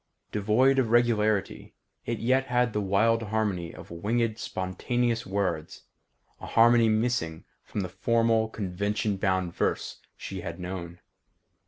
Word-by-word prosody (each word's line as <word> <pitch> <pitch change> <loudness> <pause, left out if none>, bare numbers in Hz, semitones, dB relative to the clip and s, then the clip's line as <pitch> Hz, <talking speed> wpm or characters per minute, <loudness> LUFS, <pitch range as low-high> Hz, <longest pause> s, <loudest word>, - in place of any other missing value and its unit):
Devoid 115 +6 +3
of 120 -4 +1
regularity, 110 -4 +1 0.3
it 115 - -1
yet 130 +4 +1
had 125 -2 +1
the 105 - 0
wild 105 +4 +2
harmony 105 -6 -1
of - - -12
winged, 110 +6 -1
spontaneous 115 +6 -2
words; 95 -5 -2 0.6
a - - -8
harmony 115 0 +5
missing 110 -8 0 0.2
from 105 - -4
the 95 - -3
formal, 115 +3 +1
convention 100 +1 -2
bound 95 -3 0
verse - - -2 0.2
she - - -6
had - - -6
known. 90 -1 -6
110 Hz, 130 wpm, -27 LUFS, 95-115 Hz, 0.6 s, harmony